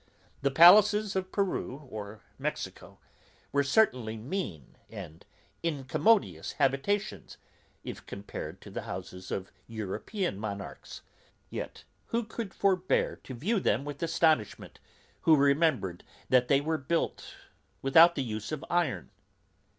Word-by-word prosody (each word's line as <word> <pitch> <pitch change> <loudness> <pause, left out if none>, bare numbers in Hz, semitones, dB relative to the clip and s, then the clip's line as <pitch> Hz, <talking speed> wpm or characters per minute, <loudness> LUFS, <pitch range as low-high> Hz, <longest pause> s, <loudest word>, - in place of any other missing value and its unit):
The 140 - +2
palaces 205 +7 +7
of 185 0 -2
Peru 155 -8 -2
or 105 -2 -8 0.2
Mexico - - -5 0.5
were 140 - +3
certainly 130 - +2
mean 110 - -5
and 90 -7 -9 0.4
incommodious 165 - +1
habitations, 140 +11 -1 0.5
if - - -8
compared 100 +1 -7
to - - -11
the - - -4
houses 90 0 -7
of 95 -1 -4 0.2
European 110 - -3
monarchs; 100 -2 -7 0.5
yet - - -6 0.2
who 235 +1 0
could 225 -2 -6
forbear 185 -2 +1
to 130 - -9
view 195 - 0
them 135 - +1
with 145 -1 -7
astonishment, 160 -9 +1 0.4
who 160 - +6
remembered 140 - +2 0.3
that 125 -1 +4
they 140 +1 +4
were 160 +1 -1
built 165 +5 -2 0.5
without 165 +6 +7
the 140 - -1
use 110 -1 -5
of 155 +1 -4
iron? 170 - 0
140 Hz, 120 wpm, -29 LUFS, 110-180 Hz, 0.5 s, palaces